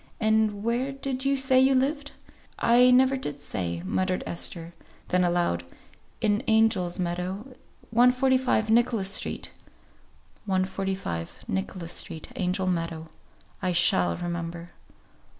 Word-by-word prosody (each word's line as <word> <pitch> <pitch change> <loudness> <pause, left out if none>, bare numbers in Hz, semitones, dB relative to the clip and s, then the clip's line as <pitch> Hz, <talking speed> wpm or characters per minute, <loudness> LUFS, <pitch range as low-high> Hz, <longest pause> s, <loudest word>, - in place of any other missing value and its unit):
"And 220 -2 +1
where 240 +4 0
did 270 -1 -4
you 275 0 +2
say 265 -1 +3
you 265 +1 +4
lived?" 285 +2 0 0.4
"I 245 +2 +5
never 260 +2 +5
did 145 - -4
say," 85 -9 -3
muttered 185 - -1
Esther; 170 0 -4 0.4
then 180 0 +2
aloud, 175 - +1 0.6
"In 210 0 +2
Angel's 220 -6 +2
Meadow, 185 +7 -3 0.4
145, 250 -1 +3
Nicholas 230 -4 +2
Street." - - -2 1.0
"145, 190 - -2
Nicholas 165 - -3
Street, 160 - -3
Angel 185 +1 -1
Meadow. 165 -3 -2 0.5
I 185 -2 0
shall 90 - +3
remember." 170 0 -5
195 Hz, 115 wpm, -26 LUFS, 175-250 Hz, 1.0 s, I